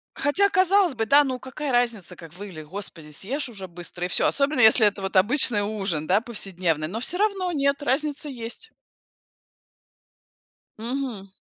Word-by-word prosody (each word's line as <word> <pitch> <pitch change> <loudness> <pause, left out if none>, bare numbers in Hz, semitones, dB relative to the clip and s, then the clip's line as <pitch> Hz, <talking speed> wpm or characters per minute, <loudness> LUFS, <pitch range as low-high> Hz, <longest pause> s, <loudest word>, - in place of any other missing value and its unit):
Хотя, 400 +8 +2
казалось 375 -3 +3
бы, 225 -2 -2
да, 285 +5 +5
ну 260 -2 -4
какая 265 +3 -6
разница, 235 -7 -1
как 165 -2 -13
выглядит? 180 -5 -10
Господи, 170 -4 -7
съешь 255 - -4
уже 195 -5 -8
быстро 175 +1 -6
и - - -1
всё, - - +2
особенно 280 0 +1
если 220 -1 +6
это 205 -1 0
вот 195 0 -5
обычный 215 +2 +6
ужин, 195 -7 -3
да, 190 +4 +3
повседневный, 180 - -2
но 215 +6 -5
всё 345 +8 -1
равно- 390 -3 0
нет, 280 -1 0
разница 295 +2 -1
есть. 240 - -7 2.1
Мгм. 230 -4 -4
230 Hz, 155 wpm, -24 LUFS, 190-285 Hz, 2.1 s, если